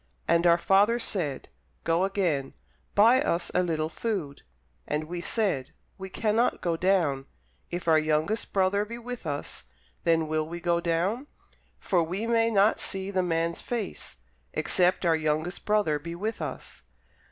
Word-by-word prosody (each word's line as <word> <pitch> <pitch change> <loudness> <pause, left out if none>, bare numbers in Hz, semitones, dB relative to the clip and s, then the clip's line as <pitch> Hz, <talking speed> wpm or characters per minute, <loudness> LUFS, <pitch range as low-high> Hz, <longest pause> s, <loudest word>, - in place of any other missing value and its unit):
And 170 +1 +4
our 170 0 +6
father 200 +6 +4
said, 175 - -2 0.4
Go 165 +3 +2
again, 175 -9 -1 0.4
buy 230 +6 +6
us 175 - -1
a - - +3
little 160 -3 -1
food. 165 -6 -4 0.5
And 150 +1 -1
we 170 +2 -5
said, 175 - -1 0.3
We 190 0 -6
cannot 220 +4 +1
go 170 -2 0
down: 165 -7 +1 0.4
if 175 0 -5
our 160 -1 +6
youngest 155 +7 0
brother 195 +1 +2
be 230 +3 -7
with 240 -5 -7
us, 145 -1 -4 0.4
then 165 -1 +2
will 155 0 -1
we 170 +1 -6
go 170 0 +1
down: 180 - 0 0.5
for 180 -3 +1
we 180 +7 -2
may 230 -1 +3
not 210 0 +3
see 195 0 -3
the 190 -1 +1
man's 170 -1 -1
face, 225 - -5 0.4
except 180 0 +2
our 165 -1 +4
youngest 155 +3 -2
brother 205 -8 +2
be 170 +3 -6
with 215 +6 -3
us. - - -6
175 Hz, 155 wpm, -27 LUFS, 160-205 Hz, 0.5 s, our